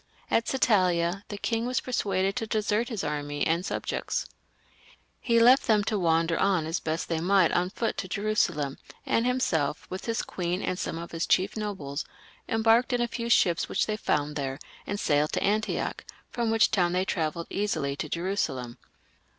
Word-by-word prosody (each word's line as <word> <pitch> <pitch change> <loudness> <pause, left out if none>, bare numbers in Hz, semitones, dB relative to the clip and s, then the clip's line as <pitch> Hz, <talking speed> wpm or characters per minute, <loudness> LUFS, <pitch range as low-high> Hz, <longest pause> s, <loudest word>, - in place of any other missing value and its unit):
At 230 - +2
Satalia 185 -7 +2
the 205 - -6
king 230 +3 -1
was 250 - 0
persuaded 195 -6 0
to 225 -3 -2
desert 215 +1 0
his 220 -6 -3
army 145 0 -2
and 165 +2 +1
subjects. - - -2 0.9
He 235 -2 +2
left 250 +4 +6
them 215 -2 +4
to 210 0 -1
wander 165 -1 +2
on 190 -5 +2
as 165 +2 -1
best 160 +1 -3
they 165 -1 -1
might 185 0 +3
on 180 +1 +1
foot 225 +3 -2
to 185 - -3
Jerusalem, 185 -9 0 0.3
and 230 +2 +1
himself, 165 - 0
with 185 - -5
his 230 -1 -1
queen 180 +1 -3
and 185 - -2
some - - -3
of 170 +1 -7
his 165 0 -2
chief 190 +3 +2
nobles, 190 -10 -4 0.5
embarked 225 +3 +3
in 245 - +1
a 240 - +1
few 235 0 -4
ships 175 -7 +3
which - - +1
they 215 - -1
found 150 -7 -1
thete, 135 -1 -3 0.3
and 205 - -3
sailed 150 -3 +1
to - - 0
Antioch, 215 +2 -1 0.3
from 235 -2 -1
which 225 0 +4
town 175 -3 +2
they 185 +1 +1
travelled 165 -2 -2
easily 170 -9 -1
to 155 - -4
Jerusalem. 150 -10 -2
190 Hz, 180 wpm, -27 LUFS, 165-220 Hz, 0.9 s, left